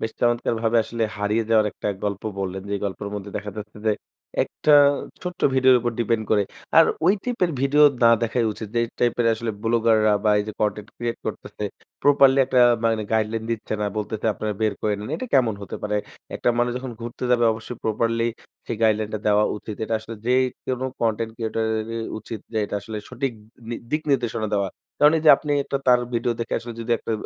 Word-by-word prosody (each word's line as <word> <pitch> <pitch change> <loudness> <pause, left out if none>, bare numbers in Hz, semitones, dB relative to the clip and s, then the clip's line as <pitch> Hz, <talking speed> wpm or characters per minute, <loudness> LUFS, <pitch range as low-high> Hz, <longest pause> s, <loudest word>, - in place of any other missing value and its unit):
বেশ 110 - -3
চমৎকারভাবে 115 -1 +1
আসলে 115 +1 -4
হারিয়ে 105 +2 0
যাওয়ার 110 -2 +5
একটা - - -4 0.2
গল্প 100 -1 -2 0.2
বললেন। 95 0 -3
যেই 100 -1 -1
গল্পের 100 +1 -4
মধ্যে 100 0 -6
দেখা 105 0 -5
যাচ্ছে 105 0 -8
যে - - +5 0.5
একটা 150 - +2 0.5
ছোট্ট 180 0 -6
ভিডিওর 130 -1 +6
উপর 120 0 -1
ডিপেন্ড 115 -1 0
করে। 105 -2 +4 0.4
আর 165 - +9 0.2
ওই 190 - +6
টাইপের 235 -8 0
ভিডিও 145 +2 +5 0.2
না 115 - +8
দেখাই 115 +1 +1
উচিত। 110 +1 -7
যে - - +4 0.2
টাইপের 120 -1 +2
আসলে 115 +1 -3
ব্লগার 115 -2 +3
বা 105 - +4
এই 105 - 0
যে - - -4
কনটেন্ট 105 0 -1
ক্রিয়েট 120 -1 -3
করতেছে 105 - -5 0.4
প্রপারলি 140 -1 +5
একটা 130 -1 +3 0.2
মানে 115 -1 +2
গাইডলাইন 110 0 0
দিচ্ছে 110 -1 -3
না। 105 - 0
বলতেছে 110 +1 -3
আপনারা 105 -1 -3
বের 110 -1 +2
করে 105 -1 +1
নেন। 105 - -6
এটা 255 - -5
কেমন 120 -5 +4
হতে 100 - -6
পারে। 105 0 -1 0.4
একটা - - 0
মানুষ 120 0 +2
যখন 130 -1 -6
ঘুরতে 120 +2 -6
যাবে 120 -1 +4
অবশ্যই 110 +2 -7
প্রপারলি 115 +1 +1 0.4
সেই 115 - -3
guideline 110 -1 +2
টা - - -1
দেওয়া 105 0 +4
উচিত। 105 0 -7
এটা 115 - -2
আসলে 110 +1 -8
যে 125 - +3 0.3
কোন 130 -1 -2 0.2
কনটেন্ট 115 0 0
ক্রিয়েটরই 110 0 -2 0.2
উচিত 110 0 -7
যে 110 - 0
এটা 105 - -6
আসলে 110 +1 -7
সঠিক 130 +1 -2 0.4
নি 120 - -2 0.2
দিক 155 +1 0
নির্দেশনা 120 -5 0
দেওয়া। 100 -1 +1 0.3
কারণ 150 +1 +6
এইযে 155 -1 +6
আপনি 145 +1 -3 0.4
তার 125 -1 +6
ভিডিও 120 +1 +1
দেখে 115 - -2
আসলে 120 0 -8
যদি 115 +1 -6
একটা - - -4
115 Hz, 195 wpm, -23 LUFS, 110-120 Hz, 0.5 s, আর